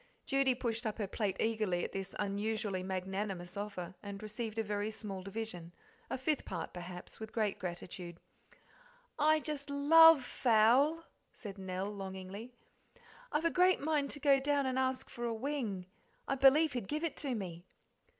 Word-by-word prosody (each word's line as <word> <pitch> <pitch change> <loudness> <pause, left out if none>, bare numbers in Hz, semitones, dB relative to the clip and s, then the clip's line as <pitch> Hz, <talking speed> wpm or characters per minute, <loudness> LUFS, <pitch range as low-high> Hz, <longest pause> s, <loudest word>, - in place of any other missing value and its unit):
Judy 275 -2 +3
pushed 235 -2 -2
up 215 - -3
her 215 - -1
plate 195 -1 -2
eagerly 215 -6 +1
at - - -3
this 195 0 -5
unusually 205 -1 -1
magnanimous 190 -1 -3
offer, 200 -3 -5
and 200 0 -7
received 215 +1 -5
a 225 - +1
very 205 0 -2
small 210 -3 -5
division, 190 -4 -5 0.4
a - - -2
fifth 275 +3 0
part, 170 - -5
perhaps, 180 0 -8
with 220 -1 -7
great 215 -3 0
gratitude. 175 -1 -6 1.0
"I 310 +1 +5
just 295 -2 -4
LOVE 305 +1 +8
fowl," 250 +8 +4 0.3
said 205 -3 -8
Nell 190 +1 -3
longingly; 195 +3 -7 0.8
"I've 305 +2 0
a 335 - +3
great 365 +1 +4
mind 290 -2 0
to 290 - -5
go 280 -2 +5
down 285 0 +1
and 260 0 0
ask 260 0 0
for 240 - -7
a 235 - 0
wing 225 -7 -3 0.4
I - - +1
believe 275 +3 +5
he'd 245 -6 -3
give 305 +2 -2
it 335 - -1
to 275 -4 -2
me." 175 -5 -5
220 Hz, 165 wpm, -34 LUFS, 195-275 Hz, 1.0 s, LOVE